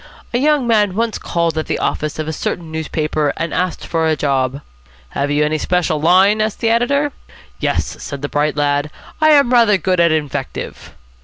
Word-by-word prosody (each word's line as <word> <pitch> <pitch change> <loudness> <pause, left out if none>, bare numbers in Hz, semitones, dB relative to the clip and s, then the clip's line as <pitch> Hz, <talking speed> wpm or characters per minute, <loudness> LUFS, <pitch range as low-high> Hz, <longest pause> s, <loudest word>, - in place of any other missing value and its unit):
A 240 - +2
young 295 -1 +2
man 210 -5 +2
once 230 -1 -1
called 170 -2 -1
at 155 - -4
the - - -1
office 155 0 -2
of 155 -1 -3
a 160 - -3
certain 165 +1 -4
newspaper, 155 -2 -1
and 165 0 -3
asked 180 -1 -2
for 165 -1 0
a 160 - +2
job. 135 -1 -1 0.5
'Have 140 - -2
you 145 +1 +2
any 155 +1 -1
special 175 -4 0
line?' 190 +6 +4
asked 215 -1 -2
the 225 -1 +1
editor. 280 +5 +1 0.5
'Yes,' - - -1
said 140 -1 -7
the - - 0
bright 145 0 -1
lad, 145 0 +1 0.3
'I 310 - +5
am 280 -5 +5
rather 230 -4 +5
good 185 0 0
at 170 -1 +4
invective.' 145 -3 -4
165 Hz, 190 wpm, -18 LUFS, 150-215 Hz, 0.5 s, I